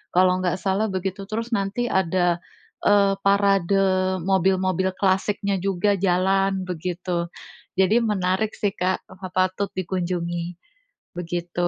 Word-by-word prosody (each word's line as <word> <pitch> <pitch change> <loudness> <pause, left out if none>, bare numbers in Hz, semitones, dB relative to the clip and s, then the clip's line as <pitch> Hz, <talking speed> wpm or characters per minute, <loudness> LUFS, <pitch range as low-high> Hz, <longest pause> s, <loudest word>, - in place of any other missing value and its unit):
kalau 185 0 +4
nggak 180 -2 0
salah 200 +3 +1
begitu. 195 +1 -4
Terus 230 +3 -4
nanti 210 +3 -1
ada, 175 -1 +2 0.5
eee, 200 -1 +4
parade 200 -1 +3 0.5
mobil-mobil 190 0 +1
klasiknya 200 +1 0
juga, 195 +1 +1
jalan, 195 +1 +2
begitu. 175 0 -3 0.5
Jadi, 190 +5 +4
menarik 210 -1 0
sih, 205 - 0
Kak, 185 -1 -1
eh, 185 0 -10
patut 185 +2 +1
dikunjungi, 175 -1 -3 0.6
begitu. 175 0 -2
190 Hz, 115 wpm, -23 LUFS, 180-200 Hz, 0.6 s, kalau